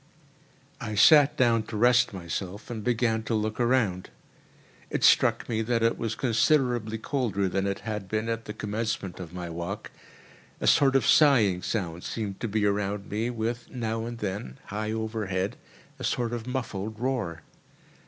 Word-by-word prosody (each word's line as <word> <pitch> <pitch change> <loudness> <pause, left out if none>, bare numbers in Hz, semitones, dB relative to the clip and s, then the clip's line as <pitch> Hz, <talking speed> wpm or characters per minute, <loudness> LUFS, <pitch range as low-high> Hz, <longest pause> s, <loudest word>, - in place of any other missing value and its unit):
I 110 -1 -4
sat 145 +6 +6
down 115 -3 +4
to 110 - -5
rest 120 +2 +4
myself, 95 +3 -5
and 110 -3 -5
began 115 -1 +1
to 115 0 -2
look 110 +1 -2
around. 115 -7 +1 0.8
It - - -2
struck - - +4
me 110 -1 -1
that 115 0 0
it 115 - +3
was 115 -1 -3
considerably 120 -2 +1
colder 110 -6 -1
than 95 +2 -1
it 100 0 -3
had 105 -2 -4
been 110 +2 -1
at 115 0 -3
the 105 - -6
commencement 105 -3 -3
of 85 -3 -7
my 90 -1 -6
walk—a 85 +4 -9
sort 135 -2 +5
of 135 - +3
sighing 115 - +5
sound 90 -6 -3
seemed 105 -4 -4
to - - -2
be 105 0 0
around 100 0 -1
me, 110 +3 -1
with, 115 0 -3
now 115 -2 -3
and 120 0 -6
then, 95 - -4
high 110 +1 -3
overhead, 110 -2 -2 0.4
a - - -7
sort 120 -1 -1
of 120 0 -5
muffled 110 -5 -4
roar. 115 - -2
110 Hz, 165 wpm, -27 LUFS, 100-120 Hz, 0.8 s, sat